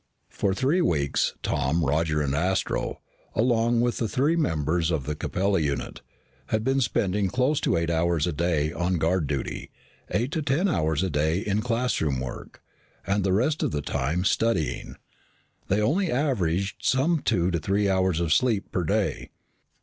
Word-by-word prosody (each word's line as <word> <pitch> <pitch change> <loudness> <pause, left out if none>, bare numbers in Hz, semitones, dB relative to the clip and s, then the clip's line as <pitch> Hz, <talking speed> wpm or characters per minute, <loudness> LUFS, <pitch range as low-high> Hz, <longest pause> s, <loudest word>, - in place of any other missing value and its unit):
For 95 -1 -1
three 140 - +2
weeks, 70 - +1
Tom, 80 +4 0
Roger, 75 +1 +1
and 70 -1 -1
Astro, 90 +6 -1 0.3
along 115 0 +2
with 120 0 0
the 115 - 0
three 145 +8 +2
members 80 - 0
of 80 -5 0
the 75 - -2
Capella 95 +5 0
unit, 70 -3 -3 0.5
had 110 0 0
been 135 +2 +1
spending 100 -4 +1
close 130 +7 +1
to - - +1
eight 85 0 0
hours 85 -1 +1
a 90 - -1
day 80 -1 0
on 90 +1 0
guard 85 0 +1
duty, 70 -2 -4 0.4
eight 120 +6 -1
to 160 - -1
ten 145 +7 +1
hours 80 - 0
a 95 - 0
day 75 +3 +1
in 105 0 0
classroom 115 - 0
work, 65 0 -8 0.4
and 100 +1 0
the 95 - +1
rest 125 +11 +1
of - - +1
the 75 -1 -3
time 80 +10 -1
studying. 105 - 0 0.7
They 100 - +1
only 170 - +1
averaged 100 - 0
some 150 +6 +2
two 90 -8 +1
to 85 - 0
three 100 +5 +1
hours 95 -3 +1
of 85 -3 +2
sleep 115 -3 +1
per 90 - -1
day. 80 - -1
95 Hz, 170 wpm, -26 LUFS, 80-120 Hz, 0.7 s, three